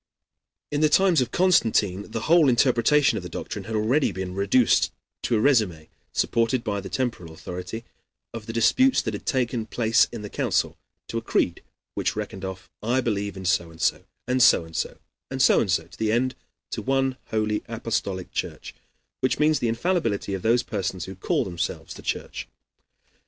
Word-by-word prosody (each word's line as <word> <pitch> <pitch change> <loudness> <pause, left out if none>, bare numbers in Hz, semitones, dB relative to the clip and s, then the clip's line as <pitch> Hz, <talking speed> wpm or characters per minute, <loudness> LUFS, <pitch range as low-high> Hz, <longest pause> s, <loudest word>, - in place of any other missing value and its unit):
In 145 0 0
the 155 - +5
times 180 -2 +4
of 125 - -1
Constantine 110 - +2
the 115 0 -4
whole 160 +1 +5
interpretation 130 +3 +3
of - - -5
the - - -7
doctrine 100 -2 -6
had 110 - -5
been 105 -1 +1
already 130 +3 +2
reduced 95 +6 +2 0.3
to 115 - +1
a - - +1
RÉSUMÉ 105 - +2 0.2
supported 115 +1 +1
by 105 -4 -2
the 95 - -8
temporal 115 -7 -3
authority 90 +7 -7 0.5
of 115 -2 -7
the - - -3
disputes 255 - +3
that 110 - -3
had 100 - -7
taken 120 -3 0
place 115 0 +3
in 115 -3 -7
the 105 - -6
Council - - 0 0.3
to - - -2
a - - -10
creed - - 0 0.3
which - - -1
reckoned 95 0 -5
off 95 -1 -6
I 120 +4 +1
believe 100 -5 -2
in 95 - -7
so 85 -2 +1
and 80 0 -15
so, - - +1 0.2
and 125 0 +1
so 85 - +6
and 80 0 -13
so, - - -2 0.3
and 135 - -4
so 130 - +5
and 105 - 0
so 95 - +2
to - - -17
the 110 -1 +1
end 130 +3 +1 0.4
to - - -3
one 135 0 +1
holy, 110 -1 0
Apostolic 105 -5 -3
Church, - - -5 0.5
which 130 - +1
means 150 -1 +3
the 120 - 0
infallibility 115 - 0
of 95 - -3
those 120 +4 +3
persons 95 -3 -3
who 95 - -7
call 95 - 0
themselves 85 -2 -4
the - - -11
Church. - - -4
115 Hz, 190 wpm, -25 LUFS, 100-130 Hz, 0.5 s, so